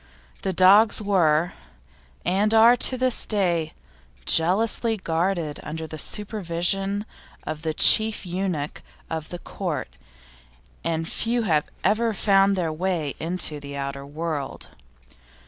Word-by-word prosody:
The 190 - -2
dogs 195 +4 +5
were, 175 -5 +1 0.7
and 205 +5 +1
are 230 +2 +7
to 255 +1 +1
this 255 -1 +2
day, 175 -7 -1 0.5
jealously 215 - +2
guarded 170 -3 -2
under 160 +1 -6
the 155 0 -8
supervision 195 0 -1 0.4
of 155 -1 -6
the 160 -1 -3
Chief 220 +3 +5
Eunuch 175 -5 -4 0.3
of 160 -1 -5
the 175 - -6
Court, - - -5 0.9
and 165 -1 -2
few 235 +5 -1
have 155 -7 +1 0.2
ever 220 +2 +1
found 195 0 +3
their 170 -4 -2
way 165 -4 -2
into 165 -3 +1
the 140 0 -8
outer 140 0 -5
world. 150 -1 -5
180 Hz, 120 wpm, -23 LUFS, 160-205 Hz, 0.9 s, are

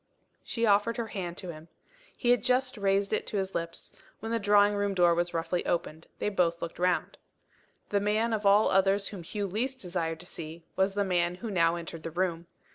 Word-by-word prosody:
She 230 -1 -1
offered 210 +2 +3
her 230 -2 -3
hand 175 -3 -5
to 185 - -7
him. 155 0 -12 0.5
He 245 - +2
had 245 - +3
just 255 +1 +2
raised 200 0 +1
it - - -1
to 210 - -3
his 190 -1 -2
lips 170 0 -3 0.3
when 225 +1 -5
the 230 - +1
drawing 205 0 +5
room 205 -1 0
door 175 -2 +5
was 175 +1 0
roughly 170 +2 -1
opened. 165 -2 -2
They - - -1
both 175 -4 +1
looked 170 - -6
round. 180 0 0 0.7
The 200 - +2
man 215 +3 +1
of 215 -1 -1
all 205 +2 +5
others 195 +1 +3
whom 195 -4 -7
Hugh 205 +5 -3
least 235 +8 -2
desired 170 -4 -3
to - - -11
see 165 -1 -8
was 195 +1 +1
the 200 -1 +1
man 175 -1 +1
who 220 +4 -6
now 170 -3 +3
entered 165 -1 -7
the 165 - -5
room. 170 0 -2
195 Hz, 210 wpm, -29 LUFS, 170-210 Hz, 0.7 s, drawing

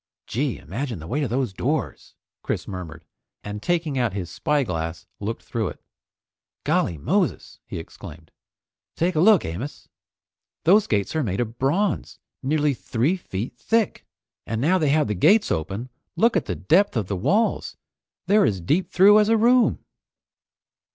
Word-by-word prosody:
"Gee! - - -2
Imagine 115 - -5
the 80 - -9
weight 140 - -2
of 130 - -1
those 125 -3 -1
doors!" 145 +9 -3 0.3
Chris - - -3
murmured, 85 -4 -7 0.4
and 105 0 -6
taking 160 -2 0
out 120 -5 0
his 95 -4 -5
spyglass 90 - -1
looked 110 +3 -4
through 115 -2 -2
it. - - -7 0.8
"Golly 85 - +1
Moses!" 70 - -1
he - - -6
exclaimed. 80 -1 -10 0.6
"Take 175 +3 +1
a 155 - 0
look, 205 +1 +5
Amos. 105 - -6 0.7
Those 195 +6 +5
gates 100 +6 0
are 160 - +2
made 100 -8 -2
of 115 -1 -3
bronze, 180 +10 0 0.2
nearly 150 +1 +1
three 130 +6 0
feet 120 - -5
thick! 225 - 0 0.4
And 110 0 -2
now 175 +9 +3
they 155 -4 +2
have 150 +1 +3
the 105 - -1
gates 195 - +4
open, 100 +10 -3 0.3
look 230 0 +3
at 180 - +1
the 90 - -2
depth 165 - +2
of 110 - 0
the 100 - -3
walls. 205 - 0 0.5
They're 210 +1 +4
as 95 -3 0
deep 150 - 0
through 205 +3 +6
as 210 0 +3
a 225 - +4
room!" 240 +2 +3
130 Hz, 160 wpm, -23 LUFS, -, 0.8 s, through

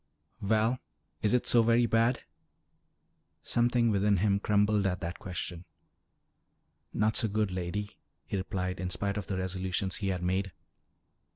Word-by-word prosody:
Val, 110 +4 +2 0.4
is 105 - +2
it 125 0 +2
so 120 - +6
very 115 +1 +4
bad?" 115 +2 +2 1.2
Something 120 -1 +2
within 100 0 +3
him 100 +1 +2
crumbled 105 0 +2
at 90 -1 -1
that 85 +1 -5
question. 90 -2 -5 1.3
"Not 110 +1 +1
so 115 - +2
good, 105 -1 0
Lady," 95 +3 -4 0.3
he - - -4
replied 95 -2 -3
in 90 0 -2
spite 100 +2 -2
of 105 - -4
the 95 - -2
resolutions 95 +1 -1
he 100 - -3
had 90 -2 -1
made. 95 +1 -1
100 Hz, 145 wpm, -30 LUFS, 95-110 Hz, 1.3 s, so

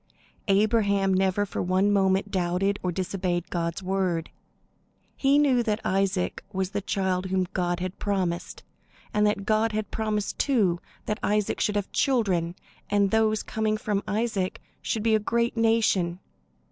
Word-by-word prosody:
Abraham 200 -1 +3
never 190 +2 +2
for 200 - -4
one 185 +3 +2
moment 190 0 +2
doubted 185 +2 0
or 180 - -1
disobeyed 180 -1 -2
God's 170 +1 -2
word. 185 -3 -1 0.8
He 275 +1 +3
knew 275 -4 +4
that 220 -2 0
Isaac 190 -1 0
was 190 0 -2
the 205 -1 -2
child 190 -1 -1
whom 185 0 +1
God 175 -1 -1
had 185 0 -4
promised, 185 -4 -2 0.5
and 210 0 +3
that 200 -1 -1
God 220 +1 +2
had 215 -1 -3
promised, 215 -2 -2
too, 205 -11 +2 0.3
that 210 +2 -2
Isaac 210 0 0
should 210 - +1
have 205 -1 -2
children, 190 - +1 0.3
and 200 -1 +2
that - - +2
those 215 -1 +1
coming 215 -1 -1
from 210 -2 -1
Isaac 210 -3 -1 0.2
should 220 - -2
be 225 -1 +3
a 215 - +4
great 235 +2 0
nation. 220 -6 +2
200 Hz, 155 wpm, -26 LUFS, 185-215 Hz, 0.8 s, knew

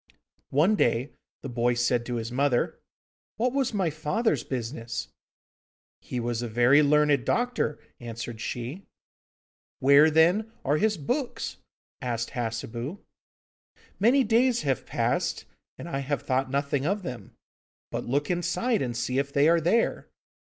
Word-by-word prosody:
One 165 +10 +3
day 120 - +1 0.3
the - - -4
boy 120 0 +1
said 120 0 +1
to 125 - -2
his 115 0 -4
mother: 130 -1 +1 0.6
'What 245 +2 +1
was 270 -2 +1
my 190 -7 0
father's 155 - 0
business?' 115 -2 -4 0.9
'He 125 - -4
was 120 -1 -2
a 120 - -3
very 120 +6 +5
learned 150 -2 +3
doctor,' 245 -11 0 0.2
answered 115 -1 -6
she. 125 +11 -5 0.9
'Where, 140 +3 +6
then, 175 +8 +3
are 145 +2 +2
his 215 +3 +1
books?' 245 - -3 0.4
asked 120 -2 -2
Hassebu. 120 - -4 1.0
'Many 250 +7 +5
days 240 +2 +2
have 135 -4 -1
passed, - - -1 0.3
and - - -8
I 135 -5 -2
have 140 +1 -2
thought 130 0 0
nothing 140 0 0
of 195 +6 -1
them. 125 -7 -7 0.6
But - - -3
look 145 +6 0
inside 220 +7 0
and 120 -3 -2
see 125 +2 0
if 140 0 -2
they 140 +2 +4
are 170 0 +4
there. 220 +9 +1
140 Hz, 140 wpm, -27 LUFS, 120-180 Hz, 1.0 s, Where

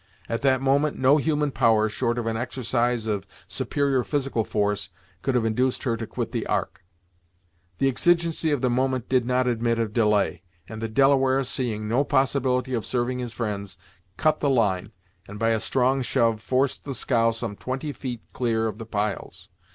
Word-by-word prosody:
At 115 - -2
that 130 -1 +2
moment 140 +2 +2
no 135 +3 +5
human 150 -1 0
power, 115 -4 +3
short 120 +2 -1
of 120 - -2
an 115 0 -1
exercise 120 -1 -1
of 100 -3 -2 0.2
superior 140 -3 0
physical 135 -5 -1
force, 105 -1 -1 0.3
could 135 - 0
have 120 -2 +2
induced 125 +3 0
her 120 -4 0
to 115 -1 -5
quit - - -4
the - - -3
Ark. - - -2 0.9
The 135 - +2
exigency 170 +3 +2
of 145 -4 0
the 125 - +3
moment 130 0 0
did 125 -2 +2
not 125 0 +2
admit 115 -1 +1
of 115 -2 -1
delay, 105 -7 +2 0.3
and 110 0 -8
the 115 - -1
Delaware 135 +2 +3
seeing 120 -5 -2
no 120 +6 +2
possibility 130 -2 +1
of 115 -3 -1
serving 125 0 -1
his 120 -2 -4
friends, 105 -4 -4 0.4
cut 155 -1 +2
the 145 - +1
line 105 -6 +1 0.4
and 105 - -8
by 115 +2 +1
a 110 - +2
strong 130 +3 +1
shove 115 -3 +1
forced 130 +3 0
the 140 -2 -5
scow 115 -1 +2
some 115 -2 -4
twenty 130 +6 -4
feet 125 -5 -6
clear 115 -3 0
of 110 0 -3
the 115 - -7
piles. 105 -1 -3
125 Hz, 180 wpm, -25 LUFS, 110-135 Hz, 0.9 s, no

